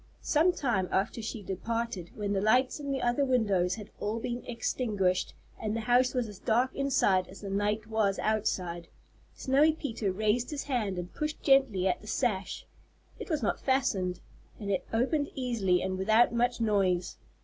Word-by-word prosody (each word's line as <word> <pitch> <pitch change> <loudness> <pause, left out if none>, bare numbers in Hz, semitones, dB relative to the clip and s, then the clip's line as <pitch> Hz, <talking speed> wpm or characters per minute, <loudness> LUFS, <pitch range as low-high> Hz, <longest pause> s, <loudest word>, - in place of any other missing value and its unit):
Some 325 +4 +3
time 235 - -1
after 200 +4 0
she 220 -1 -5
departed, 195 -1 -3
when 205 -1 -2
the 195 - 0
lights 250 +7 +3
in 285 -1 -5
the 270 - -1
other 240 +4 +2
windows 205 -9 +2
had 210 -2 -10
all 215 +2 -2
been 240 +1 -4
extinguished 210 -6 -1 0.3
and 215 0 -2
the 230 - -2
house 250 +3 +3
was 250 -2 0
as 205 -3 -10
dark 250 +4 +1
inside 200 -9 +2
as 195 - -12
the 200 -2 -5
night 210 +2 0
was 215 -3 +1
outside, 180 -5 -1 0.5
Snowy 290 +4 +3
Peter 230 -10 -3
raised 215 +5 0
his 295 -2 -4
hand 220 -9 -1
and 180 0 -6
pushed 305 0 -4
gently 265 -9 +4
at 180 - 0
the 210 - -13
sash. 210 -5 -1 0.5
It - - -7
was 310 -4 -1
not - - 0
fastened, 195 -9 0 0.4
and 200 -2 -3
it 190 - -1
opened 275 +6 +1
easily 225 -9 +1
and 185 0 -2
without 220 +5 +4
much 240 +1 +1
noise. 195 -5 +1
220 Hz, 175 wpm, -29 LUFS, 195-250 Hz, 0.5 s, gently